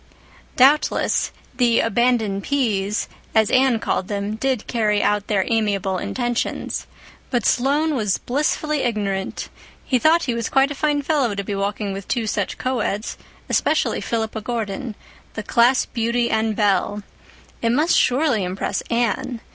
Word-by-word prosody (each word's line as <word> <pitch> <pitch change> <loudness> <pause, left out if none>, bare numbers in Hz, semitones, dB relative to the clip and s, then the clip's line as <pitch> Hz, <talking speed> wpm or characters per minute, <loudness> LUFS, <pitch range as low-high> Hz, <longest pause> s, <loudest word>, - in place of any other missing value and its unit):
Doubtless, 275 +4 +3 0.2
"the 240 -2 +3
abandoned 225 -3 +1
P's," 210 -6 0 0.3
as 220 -2 +4
Anne 260 -2 +4
called 190 -3 -2
them, 205 0 -3
did 250 +1 -1
carry 210 -3 +1
out 205 0 +1
their 195 -3 +1
amiable 200 -4 0
intentions. 240 +2 -2 0.4
But 245 -5 0
Sloane 290 +5 +2
was 210 -7 0
blissfully 300 +3 -1
ignorant; 200 -5 -2 0.4
he 255 - +2
thought 325 +5 +4
he 245 - -1
was 235 -1 -2
quite 270 +1 +3
a - - -1
fine 290 0 0
fellow 275 -8 +1
to 200 - -3
be 200 - -4
walking 200 0 -2
with 195 0 -7
two 235 -2 -1
such 205 -2 -2
coeds, 230 -4 -2 0.3
especially - - +1
Philippa 220 -1 -2
Gordon, 220 0 -4 0.4
the 215 - -4
class 240 +5 +3
beauty 235 0 -1
and 220 -1 +1
belle. 205 0 +1 0.6
It 230 - +1
must 300 +8 +3
surely 255 -5 +2
impress 185 +1 -2
Anne. 235 0 -1
230 Hz, 145 wpm, -21 LUFS, 205-255 Hz, 0.6 s, as